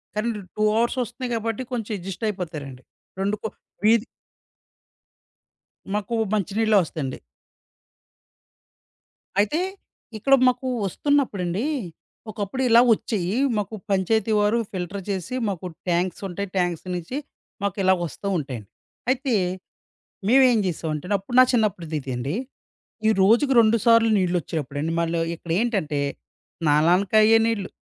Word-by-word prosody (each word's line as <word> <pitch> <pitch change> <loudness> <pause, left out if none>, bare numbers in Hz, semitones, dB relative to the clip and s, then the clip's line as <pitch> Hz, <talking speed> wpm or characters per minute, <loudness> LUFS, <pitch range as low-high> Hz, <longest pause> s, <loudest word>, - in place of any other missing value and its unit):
కానీ 220 +2 0 0.3
2 215 - 0
అవర్స్ 240 +3 +1
వస్తున్నాయి 245 +2 -6
కాబట్టి, 225 +2 -2
కొంచెం 225 -2 -3
అడ్జస్ట్ 190 +4 -5
అయిపోతారండి. 150 -9 -6 0.4
2 200 +2 +1
కొ - - 0 0.4
వీధి 225 +1 +5 1.9
మాకు 210 +3 -2 0.2
మంచి 205 -2 0
నీళ్ళే 220 -2 +4
వస్తాయండి. 145 -5 -5 2.2
అయితే 215 +11 +2 0.6
ఇక్కడ 275 +6 +2
మాకు 255 +1 +1 0.2
వస్తున్నప్పుడండి 215 -5 0 0.7
ఒకప్పుడిలా 235 +4 +3
వచ్చేయీ. 205 -1 -2 0.2
మాకు 210 +2 -3 0.2
పంచాయతీ 220 +3 +1
వారు 210 +3 +3
ఫిల్టర్ 190 +1 -4
చేసి 195 +5 -3
మాకు 185 -2 -4 0.2
ట్యాంక్స్ 175 +1 0
ఉంటాయి, 200 +2 -4
ట్యాంక్స్ 175 -1 0
నుంచి 175 +10 -4 0.4
మాకిలాగొస్తూ 190 -2 0
ఉంటాయండి. 125 -8 -6 0.4
అయితే 260 -1 +1 1.0
మేమెం 250 -1 +6
జేసామంటే 160 -2 -3
అండి. 205 - +3
అప్పుడు 240 +6 -5
నా - - +9
చిన్నప్పుడుదిదండి, 155 - -1 0.7
ఈ - - +6
రోజుకి 235 +8 +4
2 225 +1 +4
సార్లు 230 -1 +6
నీళ్ళొచ్చేప్పుడండి. 165 -4 -1
మళ్ళీ 165 0 0 0.2
ఇక్కడేంటంటే 170 -3 -1 0.6
స్నానానికి 170 +6 +3
అయ్యే 225 +1 +6
నీళ్ళు, 215 -4 -1
200 Hz, 110 wpm, -24 LUFS, 170-230 Hz, 2.2 s, నా